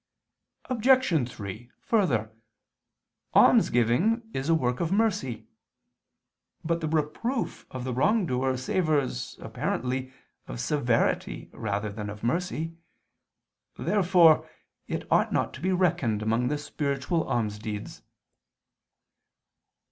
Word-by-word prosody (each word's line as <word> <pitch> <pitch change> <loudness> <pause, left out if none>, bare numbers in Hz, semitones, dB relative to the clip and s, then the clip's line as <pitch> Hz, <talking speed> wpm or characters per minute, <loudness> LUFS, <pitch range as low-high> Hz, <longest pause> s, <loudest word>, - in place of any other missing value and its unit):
Obj. 240 - +3
3: 110 +1 -8
Further, 130 - +1 1.0
almsgiving 125 - +4
is 135 +4 -3
a 165 - +5
work 125 -5 0
of 170 0 -1
mercy. 200 - 0 1.2
But 170 +1 0
the 160 - -1
reproof 160 - -2
of 130 -1 -6
the 130 0 -3
wrong 200 - +2
doer 130 -2 0
savors, 145 - -1
apparently, 130 +1 -2 0.4
of - - -6
severity 120 - 0
rather 105 0 -3
than 105 0 -5
of 105 0 -9
mercy. 165 +3 -1 1.0
Therefore 180 -5 +4 0.4
it - - -3
ought - - +3
not - - 0
to - - -10
be 185 +2 +1
reckoned 140 - +1
among 115 +3 +1
the 150 +3 0
spiritual 145 +2 -2
almsdeeds. 105 -2 -3
135 Hz, 105 wpm, -27 LUFS, 120-175 Hz, 1.2 s, a